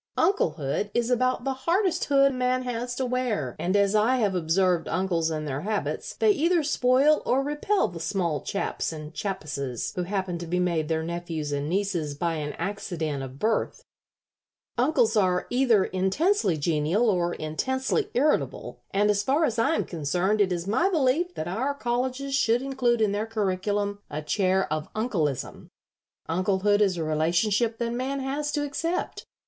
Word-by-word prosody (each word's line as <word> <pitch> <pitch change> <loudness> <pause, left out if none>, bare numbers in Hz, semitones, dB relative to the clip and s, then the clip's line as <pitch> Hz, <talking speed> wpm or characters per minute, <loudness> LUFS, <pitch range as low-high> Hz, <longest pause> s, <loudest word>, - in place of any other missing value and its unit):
Unclehood 160 - +1
is 240 +1 +1
about 255 0 +1
the 270 0 0
hardest 345 +6 0
hood 275 -1 +4
man 255 0 0
has 245 0 -3
to 260 - -1
wear, 245 - -1
and 185 +3 0
as 200 0 +3
I 215 +4 +3
have 210 -5 +1
observed 175 0 +1
uncles 170 -2 0
and 155 -1 -3
their 135 0 -3
habits, 210 +3 -3
they 435 - +4
either 340 -2 +2
spoil 280 +1 +3
or 265 +2 +1
repel 295 +8 +1
the 175 -1 -8
small 170 -4 -1
chaps 200 - -2
and 155 0 -8
chappesses 145 - -4
who 180 - -1
happen 185 -1 -2
to 170 - -6
be 180 +2 0
made 170 -4 0
their 160 0 -1
nephews 165 -3 -4
and 145 +1 -2
nieces 175 -6 -1
by 170 +3 -1
an 150 -1 -4
accident 165 -8 -3
of 135 0 -7
birth. 220 +8 -1 0.9
Uncles 245 -3 +2
are 185 -4 +2
either 245 -5 +4
intensely 190 - +1
genial 160 +8 +1
or 175 -4 +1
intensely 260 - -1
irritable, 290 +5 0
and 205 +1 +2
as 200 -1 +1
far 280 +9 +2
as 230 -4 -1
I 315 +8 +3
am - - 0
concerned 175 +6 0
it 190 -2 +2
is 175 -1 -2
my 255 - +2
belief 325 +2 +1
that 160 - -4
our 255 +11 -1
colleges 260 +2 -2
should 245 -2 +2
include 250 -4 +1
in 210 -2 +3
their 210 +2 -2
curriculum 205 -1 -1
a 150 +1 -5
chair 190 +3 +1
of 155 0 -4
'Uncleism.' 175 - -2 0.6
Unclehood 190 +4 +1
is 190 -4 +2
a 165 - -1
relationship 175 +9 +1
that 235 0 -2
man 265 +3 -2
has 285 +2 -2
to 290 -1 0
accept. 330 +5 -3
205 Hz, 170 wpm, -26 LUFS, 170-255 Hz, 0.9 s, hood